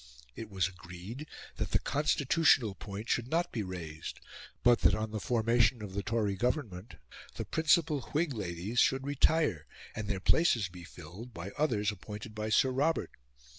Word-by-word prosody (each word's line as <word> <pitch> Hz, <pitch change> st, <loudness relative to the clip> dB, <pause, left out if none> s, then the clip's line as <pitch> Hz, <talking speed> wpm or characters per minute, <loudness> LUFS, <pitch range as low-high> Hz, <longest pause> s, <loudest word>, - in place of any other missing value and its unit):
It 110 Hz, -, -7 dB
was 95 Hz, -3 st, +1 dB
agreed 90 Hz, -, -9 dB, 0.3 s
that -, -, -2 dB
the -, -, +6 dB
constitutional 145 Hz, -, +3 dB
point 100 Hz, +3 st, -7 dB
should 120 Hz, 0 st, 0 dB
not 170 Hz, +5 st, 0 dB
be 115 Hz, -, -2 dB
raised, 85 Hz, -5 st, -6 dB, 0.4 s
but 120 Hz, -1 st, +6 dB
that -, -, +5 dB
on 110 Hz, 0 st, -3 dB
the 110 Hz, -, -3 dB
formation 115 Hz, 0 st, +2 dB
of 100 Hz, -2 st, -7 dB
the 100 Hz, -, -1 dB
Tory 105 Hz, -2 st, 0 dB
Government, 115 Hz, -, -2 dB, 0.4 s
the -, -, -4 dB
principal 160 Hz, -2 st, +2 dB
Whig 155 Hz, -1 st, 0 dB
ladies 100 Hz, +2 st, -3 dB
should 135 Hz, 0 st, +3 dB
retire, 145 Hz, -, +2 dB, 0.3 s
and 110 Hz, -1 st, -4 dB
their 100 Hz, -2 st, -1 dB
places 115 Hz, -, +3 dB
be 90 Hz, 0 st, -11 dB
filled 90 Hz, +9 st, -11 dB
by 90 Hz, +4 st, -6 dB
others 110 Hz, -8 st, +1 dB
appointed 105 Hz, +2 st, -8 dB
by 110 Hz, 0 st, -3 dB
Sir 130 Hz, +4 st, +4 dB
Robert. 145 Hz, +5 st, 0 dB
110 Hz, 165 wpm, -31 LUFS, 95-135 Hz, 0.4 s, the